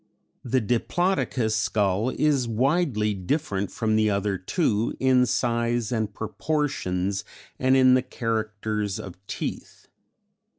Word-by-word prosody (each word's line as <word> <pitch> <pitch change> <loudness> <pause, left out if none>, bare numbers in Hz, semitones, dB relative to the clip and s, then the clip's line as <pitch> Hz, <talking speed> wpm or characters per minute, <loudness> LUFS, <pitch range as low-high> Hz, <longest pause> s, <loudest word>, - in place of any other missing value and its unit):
The 130 +1 +1
Diplodocus 120 - 0
skull 105 0 +1
is 140 -3 +1
widely 120 -2 +1
different 100 - -2
from 110 -2 0
the 110 0 +3
other 100 0 0
two 105 - 0
in 130 -1 +4
size 120 -2 0
and 110 -3 -1
proportions 100 - -2 0.4
and 130 +1 +4
in 130 -1 +6
the 130 - +4
characters 110 -4 -2
of 95 0 -9
teeth. - - -6
115 Hz, 115 wpm, -25 LUFS, 105-130 Hz, 0.4 s, in